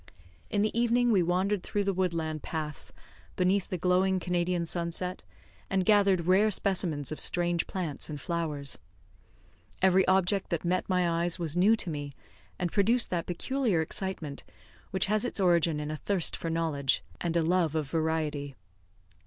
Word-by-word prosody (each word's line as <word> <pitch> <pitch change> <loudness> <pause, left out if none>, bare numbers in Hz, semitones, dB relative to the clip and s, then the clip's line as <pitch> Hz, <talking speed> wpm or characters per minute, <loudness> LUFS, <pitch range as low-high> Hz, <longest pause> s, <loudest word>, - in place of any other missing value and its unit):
In 205 - +1
the 215 - -1
evening 240 +1 +3
we 195 -4 +4
wandered 185 +3 +1
through 205 +3 -1
the 195 0 0
woodland 165 -4 -1
paths, 150 -2 -4 0.4
beneath 185 +1 +1
the 185 - -2
glowing 185 +2 +2
Canadian 175 -1 0
sunset, 175 +2 -2 0.5
and 190 -1 +1
gathered 200 -4 +4
rare 190 +4 +4
specimens 175 -8 0
of 155 - -4
strange 175 -1 +1
plants 170 -7 -4
and 150 -1 -5
flowers. 150 -4 -1 1.0
Every 190 0 +4
object 190 +1 +2
that 170 -1 -2
met 185 +3 0
my 180 -1 +2
eyes 170 +1 +1
was 165 -3 -2
new 200 +6 +5
to 185 -6 -3
me, 145 -2 -5 0.4
and 175 -2 -2
produced 230 +4 +2
that 170 -2 -1
peculiar 225 +2 0
excitement 160 -3 -4 0.5
which 190 -2 0
has 210 +2 +1
its 245 - -3
origin 170 -4 +3
in 150 0 -4
a 155 - -4
thirst 190 +1 0
for 165 - -4
knowledge, 160 -5 0 0.2
and 170 -1 0
a 165 - +2
love 165 -2 +1
of 155 -3 -1
variety. 155 -3 -2
175 Hz, 160 wpm, -29 LUFS, 160-190 Hz, 1.0 s, new